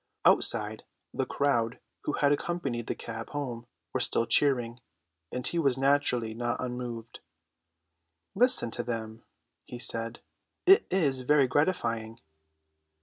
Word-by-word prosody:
Outside, - - +3 0.3
the - - -1
crowd 120 -5 0 0.3
who - - -1
had 145 -1 +2
accompanied 145 -6 -2
the - - -2
cab 115 -1 -7
home 125 -5 -5 0.3
were - - 0
still 115 - +1
cheering, 120 -1 +2 0.5
and 125 0 -4
he 170 - 0
was 135 -5 +2
naturally 135 -5 +2
not 120 +1 -2
unmoved. 120 -2 -5 1.1
"Listen 240 - +3
to - - -3
them," 115 -1 -5 0.4
he 125 - -9
said; 115 -1 -2 0.4
"it 390 +5 +7
is 145 -9 +1
very 140 +2 +4
gratifying." 115 -7 0
125 Hz, 125 wpm, -29 LUFS, 115-145 Hz, 1.1 s, it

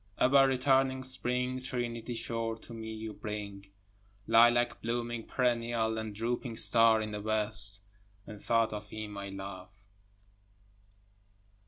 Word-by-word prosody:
Ever 135 +1 +5
returning 130 0 +1
spring, 125 0 0
trinity 120 -2 -4
sure 115 0 -3
to 115 - -12
me 110 -1 -7
you 110 0 -7
bring, 100 -2 -7 0.6
Lilac 120 +1 +4
blooming 120 0 -3
perennial 115 -3 0
and 110 -2 -6
drooping 115 +1 -3
star 115 -1 +4
in 110 - -6
the 105 0 -5
west, 105 -2 +4 0.4
And 105 -2 -10
thought 115 -1 +1
of 105 0 -7
him 110 -1 -7
I 100 0 -6
love. 95 -1 -8
115 Hz, 125 wpm, -30 LUFS, 105-120 Hz, 0.6 s, Ever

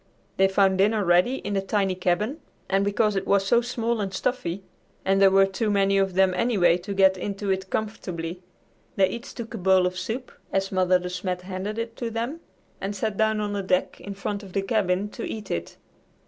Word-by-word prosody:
They 195 - +5
found 190 -1 +3
dinner 210 +1 +3
ready 180 +9 +4
in 205 -5 -4
the 195 - +1
tiny 195 -1 0
cabin, 185 - -1 0.3
and 195 +1 +2
because 205 +1 +1
it 195 - -2
was 200 -1 +3
so 235 +4 +4
small 235 -2 -1
and 195 -2 -2
stuffy, 190 -5 -2 0.4
and 195 +1 +3
there 195 - +8
were 195 0 +5
too 195 +3 -2
many 195 -1 +3
of 195 -2 0
them, 190 -1 +4
anyway, 180 -7 +3
to 200 +3 -6
get 190 -1 +5
into 200 +1 -3
it 190 0 -2
comfortably, 180 -6 -4 0.6
they 190 -1 +4
each 235 +5 -7
took 235 -1 -7
a 225 - -5
bowl 185 0 +4
of 180 0 -2
soup 225 +7 -4 0.2
as 195 0 0
Mother 185 -1 +3
De 180 0 -5
Smet 180 0 -3
handed 190 +3 -4
it 230 0 -4
to 235 - -3
them 235 +8 -3 0.4
and 200 +1 -3
sat 210 +1 -2
down 220 +1 +2
on 205 -1 -2
the 200 - -1
deck 185 -1 0
in 200 0 -7
front 200 +1 -3
of 195 -3 -12
the 195 - 0
cabin 195 -2 +1
to - - -7
eat 215 -2 -5
it. 85 0 -4
195 Hz, 215 wpm, -25 LUFS, 185-215 Hz, 0.6 s, there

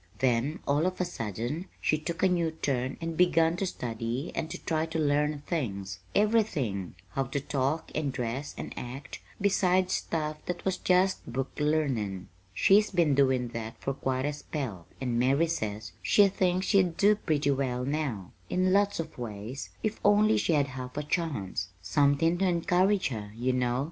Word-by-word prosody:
"Then, 130 +5 +1
all 145 +5 +3
of 185 - -3
a 180 - +1
sudden, 120 - -4
she 155 - +1
took 165 +3 -4
a - - +7
new 175 -3 +1
turn 135 -5 -2
and 165 0 -4
begun 165 -1 +4
to 195 - -1
study 120 0 -3
and 160 - -3
to - - -5
try 160 0 0
to 160 - -3
learn 150 -1 +1
things 100 - -3 0.2
everything: 155 - +1
how 135 +8 -1
to 135 +3 -2
talk 140 +3 -1
and 150 -3 -1
dress 125 +3 -4
and - - -6
act, 130 +3 -7 0.2
besides 185 -2 +2
stuff 155 -2 -2
that 180 -1 -4
was 190 -1 +1
just 185 -6 +2
book 135 +2 -2
learnin'. 130 -11 0 0.2
She's 205 - +4
been 170 -6 +3
doin' 130 -3 +3
that 115 -1 -6
for 135 - -2
quite 130 0 -1
a 150 - 0
spell 130 - -5
and 125 -3 -1
Mary 135 +6 +3
says 110 -10 -3
she 205 -1 +5
thinks 185 -1 +1
she'd 185 -5 +3
do 210 +1 +5
pretty 150 -7 +1
well 130 -2 -1
now, 135 - -2 0.2
in 185 0 +2
lots 200 -1 +3
of 165 - -5
ways, 115 +3 -6
if 215 0 -1
only 210 +1 +5
she 170 - +1
had 140 -2 +2
half 125 0 -7
a 150 - -1
chance 140 - -2
somethin' 145 - +2
to 195 - +2
encourage 180 +2 +2
her, 105 -4 -5
you 125 +3 0
know. 125 0 +1
145 Hz, 175 wpm, -29 LUFS, 125-175 Hz, 0.2 s, a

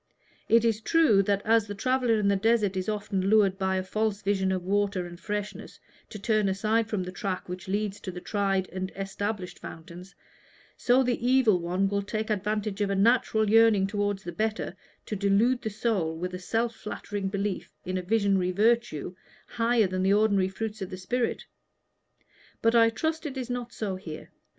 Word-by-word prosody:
It 230 0 +5
is 225 -1 +1
true 300 -7 +4
that, 200 +1 0
as 225 -1 +3
the 205 - -5
traveller 255 +1 +1
in 210 -2 +1
the 200 - +3
desert 210 -1 +2
is 185 +2 -2
often 205 -2 -2
lured, 200 -3 +4
by 190 0 0
a 185 - -1
false 215 +2 -2
vision 190 -1 +1
of 185 -1 -1
water 200 -1 0
and 175 0 -10
freshness, 210 0 -5 0.3
to - - -7
turn 215 -1 +1
aside 215 +3 +1
from 210 -4 -2
the 180 - -6
track 190 -1 -4
which 180 0 -7
leads 205 +1 -2
to - - -7
the 180 -1 -6
tried 195 -1 0
and 185 0 -4
established 195 0 -4
fountains, 170 +4 -10 0.6
so 250 +2 +3
the 245 -2 -1
Evil 245 -6 +4
One 180 +3 0
will 200 0 0
take 215 +2 -3
advantage 210 0 -2
of 205 - +1
a 200 - 0
natural 220 +1 +3
yearning 220 -2 +5
toward 205 0 -1
the 175 -3 -7
better, 220 +2 -2 0.3
to 215 - -4
delude 210 +6 +2
the 220 - -3
soul 200 -7 -1
with 180 +2 -4
a 180 - -4
self 230 +5 -1
flattering 205 -2 -5
belief 200 -1 -3
in 185 - -3
a - - -3
visionary 195 -2 +1
virtue, 215 -5 +1 0.4
higher 230 -1 +2
than 185 0 -2
the 190 +1 +3
ordinary 200 -3 +3
fruits 215 +2 -5
of 190 - -4
the 185 - -6
Spirit. 235 +6 -2 1.2
But 230 0 +4
I 230 -1 +6
trust 315 +7 -2
it 275 -2 -7
is 250 -1 -4
not 245 -1 -4
so 200 -5 -3
here. 160 -4 -9
205 Hz, 190 wpm, -27 LUFS, 190-225 Hz, 1.2 s, I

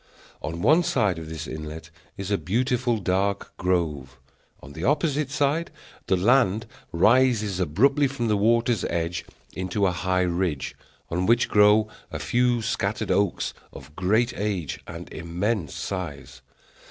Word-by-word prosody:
On 80 +3 -4
one 160 +4 +5
side 100 - +1
of 80 -1 -8
this 80 0 -5
inlet 80 +1 -7 0.3
is 100 +1 -5
a 100 - +3
beautiful 125 +3 0
dark 100 0 -1
grove; 80 -8 -1 0.4
on 70 - -12
the 80 - -7
opposite 145 - +1
side 145 +4 0 0.4
the 95 - +3
land 110 +1 +3 0.3
rises 105 +1 +3
abruptly 135 - +3
from 130 -3 -3
the 105 - +2
water's 115 +1 +2
edge 85 0 -2 0.3
into 95 +2 -1
a 95 - +3
high 90 +1 0
ridge, 85 -5 -1 0.4
on 90 +2 0
which 120 +1 +3
grow 105 +1 +5 0.2
a - - -5
few 120 -1 +1
scattered 110 0 -1
oaks 100 -3 +1 0.2
of 70 +2 -13
great 110 +6 +2
age 100 -7 -2
and - - -8
immense 85 0 -2
size. 90 -8 -5
100 Hz, 140 wpm, -25 LUFS, 85-120 Hz, 0.4 s, one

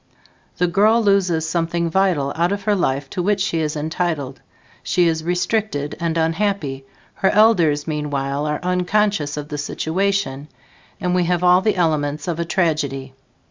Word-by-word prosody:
The 180 - +2
girl 215 +6 +3
loses 185 -6 +2
something 170 +1 -1
vital 165 -6 +1
out 170 +3 +1
of 200 0 -3
her 210 0 +2
life 140 -7 0
to 180 - -2
which 200 +3 +1
she 190 -4 0
is 155 -1 -1
entitled. 155 -3 -3 0.4
She 175 -1 +2
is 160 -1 0
restricted 180 -3 -1
and 170 -1 -1
unhappy; 165 -5 -1 0.3
her 190 - +1
elders 175 -10 +3
meanwhile, 145 -1 -2
are 150 0 -1
unconscious 180 -3 0
of 150 0 -6
the 150 - -4
situation 160 -2 -1 0.5
and 180 -1 -1
we 180 -1 +2
have 180 0 0
all 180 +1 +5
the 215 +2 +1
elements 155 -4 0
of 170 -2 -2
a 170 - -1
tragedy. 145 -7 -1
170 Hz, 160 wpm, -20 LUFS, 150-190 Hz, 0.5 s, all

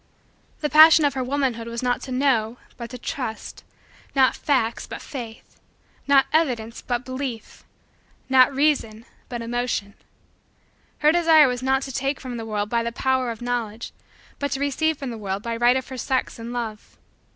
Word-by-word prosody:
The 300 - 0
passion 315 0 +8
of 285 - +1
her 260 -1 -2
womanhood 255 -3 -1
was 235 +1 -5
not 245 -1 0
to 265 - -8
know 250 -4 +1 0.2
but 235 -1 -8
to 250 - -8
trust 245 -3 -6 0.5
not 265 -1 +4
facts 255 -6 0
but - - -7
faith 240 -6 -9 0.5
not 275 -1 +5
evidence 240 -8 0
but 245 0 -3
belief 255 -3 -6 0.6
not 260 0 +5
reason 270 -6 0 0.2
but 240 -2 -5
emotion. 235 -4 -2 1.1
Her 305 - +8
desire 325 -3 +6
was 250 -1 -2
not 265 +1 +1
to 270 - -6
take 270 +2 -2
from 250 -2 -6
the 225 -1 -6
world 205 -1 -2
by 235 +2 0
the 235 0 -3
power 260 +1 0
of 230 0 -6
Knowledge 235 -2 -3 0.5
but 285 - -1
to 270 - -3
receive 290 +2 0
from 270 -3 -5
the 230 - -7
world 195 0 -4
by 235 -1 -3
right 240 +2 +4
of 260 - -5
her 260 - -7
sex 260 -2 -2
and 230 +1 -6
love. 225 -3 -6
250 Hz, 175 wpm, -23 LUFS, 230-275 Hz, 1.1 s, passion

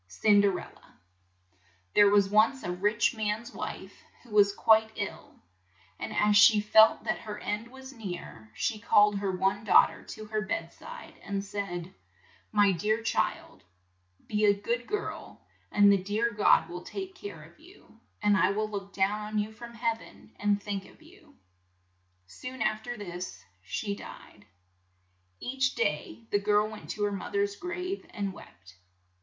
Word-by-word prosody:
CINDERELLA 200 - +1 1.0
THERE 205 -1 +7
was 200 -1 +4
once 220 +6 +3
a 175 - -2
rich 210 +7 +1
man's 220 +2 -3
wife - - -6 0.3
who 240 - -18
was 205 -1 +5
quite 220 +1 +4
ill, 205 -2 -6 0.6
and - - -5
as 210 0 +3
she 210 +1 +7
felt 220 +1 +5
that - - -1
her 210 -2 -7
end 210 +2 -3
was 265 +2 -12
near, 175 - -8
she 215 - -1
called 205 -1 +4
her 200 -1 -1
one 195 +3 0
daugh 210 - +6
ter - - -12
to 215 - -9
her 215 0 -2
bed 210 - -3
side, 485 0 -11
and 200 0 -3
said, 185 -3 -5 0.6
"My 205 -2 +4
dear 215 +5 0
child, 230 - -2 0.6
be 210 0 -1
a 200 -1 +4
good 235 +3 -2
girl, 420 0 -5 0.3
and 205 -1 +6
the 200 -2 +3
dear 215 +5 0
God 205 -5 +4
will 175 +1 -7
take 380 - -7
care 405 +2 -9
of - - -18
you, - - -19 0.2
and 205 -1 +4
I - - +4
will 215 +1 -2
look 200 -1 -6
down 200 +2 +1
on 215 0 -4
you 210 +1 -1
from 235 +2 -11
heav 230 -1 -1
en 105 +2 -16
and 205 0 +2
think 200 -1 -5
of - - -19
you." 320 -3 -19 0.9
Soon 255 - -6
af 215 0 0
ter 240 +2 -6
this 175 - -7 0.2
she 200 - -3
died. - - -12 0.9
Each 260 +1 -1
day 335 - -2
the 205 - +3
girl 210 +1 +2
went 215 -1 -10
to 210 - -3
her 205 - +1
moth 200 0 -6
er's 200 0 +1
grave 360 - -4
and 200 -2 -4
wept. 95 - -15
210 Hz, 165 wpm, -29 LUFS, 200-225 Hz, 1.0 s, THERE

